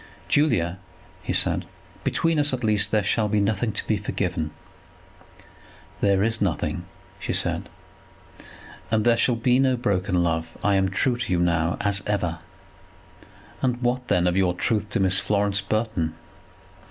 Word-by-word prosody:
"Julia," 95 - +2 0.4
he - - -3
said, - - 0 0.4
"between 165 -1 +1
us 145 -1 +2
at 125 - -2
least 105 -2 +3
there 105 -1 +2
shall 110 +2 +1
be 105 0 +1
nothing 105 +2 0
to - - -4
be 110 - +1
forgiven." 90 -5 -2 1.5
"There 100 -1 +3
is 115 +1 0
nothing," 95 -6 -1 0.4
said - - -1 0.7
she. - - -16 0.4
"And 110 -1 +1
there 120 -1 +5
shall 120 +1 +2
be 125 +2 +2
no 130 -2 +3
broken 95 -6 0
love. 80 -1 -2
I 100 - +3
am 95 -1 +2
true 120 +6 +1
to 120 - -4
you 90 - +3
now, 85 -1 +1
as 100 -1 +2
ever." 90 -6 -1 1.2
"And, 125 -2 0
what, 125 +1 0
then, 90 0 +2
of 90 0 +2
your 90 -2 +2
truth 105 +3 0
to 105 - -1
Miss 95 0 +3
Florence 100 0 +1
Burton?" 100 -6 -1
100 Hz, 155 wpm, -24 LUFS, 90-115 Hz, 1.5 s, there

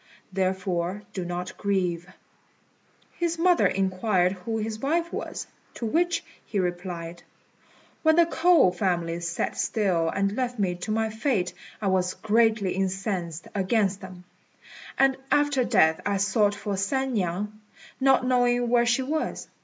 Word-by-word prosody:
Therefore 185 0 -1
do 185 - -3
not 175 +1 -5
grieve." 185 -3 -1 1.1
His 340 -1 0
mother 355 +1 +4
inquired 190 -1 +1
who 195 +4 -4
his 215 0 -3
wife 335 +6 0
was, - - -4 0.3
to 235 - -4
which 335 +6 +1 0.2
he 210 - -5
replied, 175 -2 -3 0.8
"When 315 0 +4
the 340 0 +6
K'ou 325 - +4
family 175 -2 -1
sat 170 0 -2
still 180 -7 +1
and 200 +3 0
left 250 -1 -2
me 190 -4 +1
to 180 +4 -7
my 220 0 0
fate 220 -6 0 0.3
I 215 - -5
was 185 -1 +1
greatly 220 -3 +2
incensed 190 -3 -3
against 200 0 +1
them; 185 -2 -10 0.7
and 270 0 +4
after 290 -3 +3
death 160 -8 +3
I 200 0 0
sought 205 +1 +2
for 200 -1 -3
San 265 +7 -1
niang, 205 +2 -2 0.4
not 265 -1 +4
knowing 245 -1 +2
where 240 0 +3
she 245 +2 +2
was. 310 +4 -3
200 Hz, 140 wpm, -26 LUFS, 180-245 Hz, 1.1 s, the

